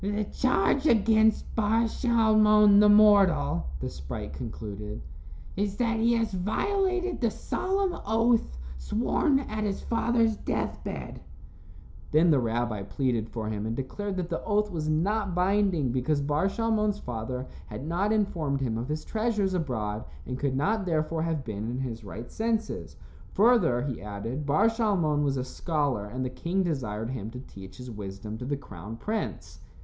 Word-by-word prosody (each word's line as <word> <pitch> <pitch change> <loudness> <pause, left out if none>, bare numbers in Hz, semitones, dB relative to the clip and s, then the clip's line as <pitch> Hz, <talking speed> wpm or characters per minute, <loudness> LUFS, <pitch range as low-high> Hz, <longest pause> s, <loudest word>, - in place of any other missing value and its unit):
"The 205 +2 0
charge 255 +6 +1
against 220 -1 +3
Bar 225 +1 +2
Shalmon, 215 -3 +5
the 210 0 +6
mortal," 195 - +5
the - - -3
sprite 70 +2 -6
concluded, 105 +3 -6 0.6
"is 200 0 -1
that 230 -2 +1
he 230 +1 +3
has 225 -3 0
violated 370 - 0
the 235 - +3
solemn 385 - -1
oath 225 - +2 0.2
sworn 270 - +1
at 215 -5 -4
his 200 -2 -2
father's 230 -2 +1
death - - -3
bed." - - -6 0.9
Then 160 +3 +5
the 145 - +4
rabbi 115 -2 -1
pleaded 115 +1 -1
for 110 -2 -4
him 110 0 -3
and 115 - -2
declared 190 - -4
that 180 -2 -3
the - - -2
oath 210 -1 +1
was 155 -3 -2
not 190 +4 0
binding 180 - +2
because 130 +4 0
Bar 145 +6 +1
Shalmon's 215 -1 0
father 125 - -4 0.2
had 135 - -7
not 180 +6 0
informed 170 -10 0
him 115 -4 -1
of 120 +4 -5
his 155 +1 -3
treasures 215 -4 0
abroad 115 - -2 0.2
and 125 - -5
could 140 -2 0
not 205 +9 +1
therefore 160 -1 0
have 160 -3 -1
been 110 0 -4
in 125 - -3
his 120 -4 -4
right 105 +5 -8
senses. 220 - -2 0.4
Further, 210 - +4
he 130 -7 -4
added, 110 +8 -5
Bar 150 +8 +3
Shalmon 195 -10 +1
was 140 -1 +1
a 130 - -1
scholar 140 -6 -1
and 130 +4 -4
the 125 - -3
king 180 +8 -1
desired 120 - -2
him 110 -5 -4
to 125 +2 -8
teach 95 -6 -12
his 125 -1 -8
wisdom 105 +1 -7
to 125 - -5
the 140 +2 -1
crown 105 -4 -9
prince. 215 - -4
160 Hz, 165 wpm, -28 LUFS, -, 0.9 s, the